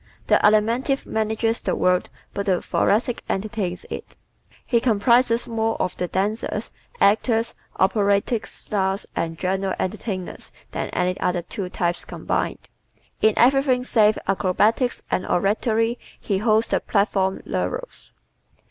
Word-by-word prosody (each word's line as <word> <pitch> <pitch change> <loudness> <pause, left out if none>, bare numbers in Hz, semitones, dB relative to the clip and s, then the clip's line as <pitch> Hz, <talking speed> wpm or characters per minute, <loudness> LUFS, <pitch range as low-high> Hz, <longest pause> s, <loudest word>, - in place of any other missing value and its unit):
The - - +4
Alimentive 230 +6 +2
manages 220 +1 -1
the - - -1
world 180 0 +2 0.2
but 200 0 -3
the 185 -2 +3
Thoracic 230 +3 +1
entertains 195 -3 -2
it. - - -7 0.5
He 235 - +2
comprises 235 +1 +3
more 225 -1 -1
of 185 - -1
the 180 - -1
dancers, 205 +5 -2 0.3
actors, 225 +2 +3 0.3
operatic 200 +3 +2
stars 195 -1 -2
and 165 -1 -2
general 190 +1 -1
entertainers 190 -1 -4 0.2
than - - -3
any 180 +1 -1
other 180 -1 0
two 180 +2 -5
types 175 -1 -1
combined. - - -3 0.5
In 220 -1 +4
everything 255 0 +4
save 215 -4 +3
acrobatics 210 +6 +1
and 185 - +1
oratory 225 +5 +1 0.2
he 195 -3 -1
holds 220 +1 +3
the - - 0
platform 195 -2 0
laurels. - - -4
210 Hz, 125 wpm, -23 LUFS, 190-230 Hz, 0.5 s, The